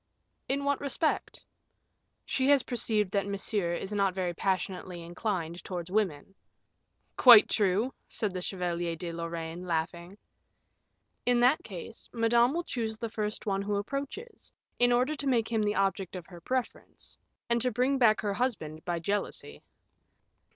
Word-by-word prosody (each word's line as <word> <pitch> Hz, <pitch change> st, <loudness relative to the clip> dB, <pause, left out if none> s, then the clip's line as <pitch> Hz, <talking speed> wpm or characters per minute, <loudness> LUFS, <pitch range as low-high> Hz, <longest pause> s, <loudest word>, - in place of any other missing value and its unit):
"In 280 Hz, +1 st, 0 dB
what 280 Hz, 0 st, 0 dB
respect?" 285 Hz, +3 st, -1 dB, 0.8 s
"She 265 Hz, 0 st, +1 dB
has 285 Hz, -2 st, +5 dB
perceived 215 Hz, -5 st, 0 dB
that 200 Hz, 0 st, 0 dB
Monsieur 200 Hz, -3 st, -1 dB
is 195 Hz, +4 st, -5 dB
not 195 Hz, -2 st, +1 dB
very 180 Hz, -2 st, -1 dB
passionately 185 Hz, -1 st, -2 dB
inclined 175 Hz, -1 st, -3 dB
towards 180 Hz, -1 st, -5 dB
women." 195 Hz, -4 st, -1 dB, 0.8 s
"Quite 240 Hz, -5 st, +9 dB
true," 210 Hz, +5 st, +1 dB
said 210 Hz, -5 st, -2 dB
the 180 Hz, -, -3 dB
Chevalier 175 Hz, -2 st, -2 dB
de 170 Hz, +1 st, -5 dB
Lorraine, 170 Hz, 0 st, -5 dB
laughing. 170 Hz, +2 st, -3 dB, 1.1 s
"In 245 Hz, -1 st, +3 dB
that 255 Hz, +5 st, +4 dB
case, 200 Hz, +3 st, -8 dB
Madame 235 Hz, +1 st, +3 dB
will 340 Hz, +3 st, -1 dB
choose 225 Hz, -7 st, -3 dB
the 230 Hz, 0 st, -4 dB
first 215 Hz, -1 st, -3 dB
one 195 Hz, -2 st, 0 dB
who 205 Hz, +1 st, -1 dB
approaches, 275 Hz, -, -5 dB, 0.3 s
in 245 Hz, 0 st, +5 dB
order 250 Hz, +5 st, +2 dB
to 285 Hz, -2 st, -4 dB
make 235 Hz, -3 st, +1 dB
him 225 Hz, -1 st, +2 dB
the 210 Hz, 0 st, +1 dB
object 195 Hz, -1 st, 0 dB
of 180 Hz, -2 st, -6 dB
her 175 Hz, -2 st, -12 dB
preference, 255 Hz, +6 st, -4 dB, 0.3 s
and 235 Hz, 0 st, +1 dB
to 250 Hz, -, +2 dB
bring 255 Hz, +4 st, +1 dB
back 220 Hz, -4 st, +5 dB
her 205 Hz, -2 st, -1 dB
husband 185 Hz, -10 st, -2 dB
by 175 Hz, -1 st, -1 dB
jealousy." 200 Hz, +5 st, -3 dB
205 Hz, 150 wpm, -29 LUFS, 180-240 Hz, 1.1 s, Quite